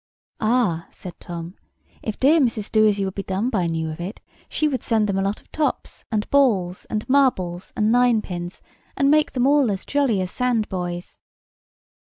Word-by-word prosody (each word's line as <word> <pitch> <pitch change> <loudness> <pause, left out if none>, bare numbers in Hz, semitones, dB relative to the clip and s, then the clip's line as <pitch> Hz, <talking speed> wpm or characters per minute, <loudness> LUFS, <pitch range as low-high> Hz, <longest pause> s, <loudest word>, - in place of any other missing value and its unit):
"Ah!" 215 -8 +1
said 180 - -10
Tom, 170 0 -7 0.5
"if 215 - -5
dear 300 +5 +5
Mrs. 230 -6 0
Doasyouwouldbedoneby 200 -1 +1
knew 160 -1 -2
of 155 +2 -7
it 190 +5 -6 0.3
she 310 - +1
would 270 -4 -2
send 220 -2 +1
them 195 -1 0
a - - +1
lot 195 +2 -1
of - - -32
tops, 300 -4 -2
and 210 -1 -1
balls, 200 -11 +2
and 215 -1 -4
marbles, 195 -11 +1
and 215 0 +2
ninepins, 215 -8 +1 0.3
and 275 0 +3
make 305 0 +3
them 250 -2 +1
all 280 -3 +4
as 195 -1 -3
jolly 275 -8 +1
as 185 -1 -2
sand 245 -4 0
boys." 175 -2 -5
215 Hz, 165 wpm, -22 LUFS, 185-250 Hz, 0.5 s, dear